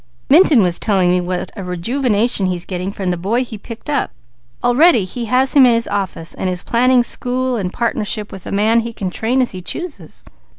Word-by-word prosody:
Minturn 300 Hz, -, +6 dB
was 175 Hz, -2 st, 0 dB
telling 190 Hz, -4 st, +2 dB
me 180 Hz, 0 st, +2 dB
what 180 Hz, 0 st, -4 dB
a 200 Hz, -, -6 dB
rejuvenation 210 Hz, +3 st, 0 dB
he's 180 Hz, -1 st, -2 dB
getting 185 Hz, +1 st, -4 dB
from 190 Hz, -2 st, -3 dB
the 175 Hz, -, -2 dB
boy 215 Hz, +9 st, 0 dB
he 230 Hz, -, -8 dB
picked 225 Hz, +2 st, -10 dB
up. 290 Hz, -1 st, 0 dB, 0.5 s
Already 245 Hz, -, +4 dB
he 235 Hz, +6 st, -5 dB
has 255 Hz, +3 st, +1 dB
him 280 Hz, -, +7 dB
in 235 Hz, -, +4 dB
his 230 Hz, 0 st, 0 dB
office, 190 Hz, -5 st, -3 dB
and 185 Hz, -, -3 dB
is 180 Hz, -1 st, -3 dB
planning 250 Hz, +1 st, +3 dB
school 250 Hz, +1 st, -2 dB
and 190 Hz, -5 st, -3 dB
partnership 210 Hz, -2 st, -2 dB
with 190 Hz, -, -10 dB
a -, -, -5 dB
man 215 Hz, +3 st, +3 dB
he 230 Hz, 0 st, -4 dB
can 190 Hz, -4 st, -4 dB
train 245 Hz, +7 st, +1 dB
as 245 Hz, -, -3 dB
he 185 Hz, -, -7 dB
chooses." 345 Hz, -, -6 dB
220 Hz, 210 wpm, -17 LUFS, 185-250 Hz, 0.5 s, him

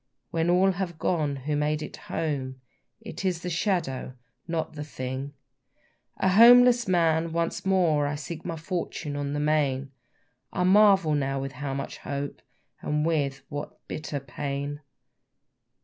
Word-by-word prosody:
When 165 Hz, +1 st, +1 dB
all 185 Hz, +2 st, +4 dB
have 180 Hz, -3 st, -4 dB
gone 155 Hz, -5 st, 0 dB
who 145 Hz, +3 st, -3 dB
made 150 Hz, +1 st, 0 dB
it -, -, -7 dB
home, 135 Hz, -5 st, -3 dB, 0.4 s
It 220 Hz, -2 st, -7 dB
is 180 Hz, -3 st, -1 dB
the 180 Hz, -, -3 dB
shadow, 160 Hz, -8 st, -1 dB, 0.3 s
not 165 Hz, -2 st, -2 dB
the 150 Hz, -1 st, -5 dB
thing. 135 Hz, 0 st, -5 dB, 0.8 s
A 190 Hz, -, +2 dB
homeless 240 Hz, +3 st, +7 dB
man, 165 Hz, -2 st, +2 dB
once 170 Hz, +3 st, -1 dB
more 165 Hz, -6 st, +3 dB
I 145 Hz, -, -2 dB
seek 155 Hz, +2 st, -7 dB
my 165 Hz, -, -4 dB
fortune 160 Hz, -3 st, -4 dB
on 145 Hz, 0 st, -2 dB
the 145 Hz, -, -1 dB
main: 140 Hz, -3 st, +1 dB, 0.6 s
I 180 Hz, -, -1 dB
marvel 195 Hz, -3 st, +5 dB, 0.3 s
with 135 Hz, 0 st, -4 dB
how 135 Hz, +1 st, -4 dB
little 140 Hz, -, -5 dB
hope, 140 Hz, 0 st, -4 dB, 0.4 s
and 150 Hz, +1 st, 0 dB
with 145 Hz, -4 st, 0 dB
what 145 Hz, 0 st, -6 dB
bitter 150 Hz, -2 st, -4 dB
pain. 140 Hz, +1 st, -4 dB
155 Hz, 145 wpm, -27 LUFS, 145-175 Hz, 0.8 s, homeless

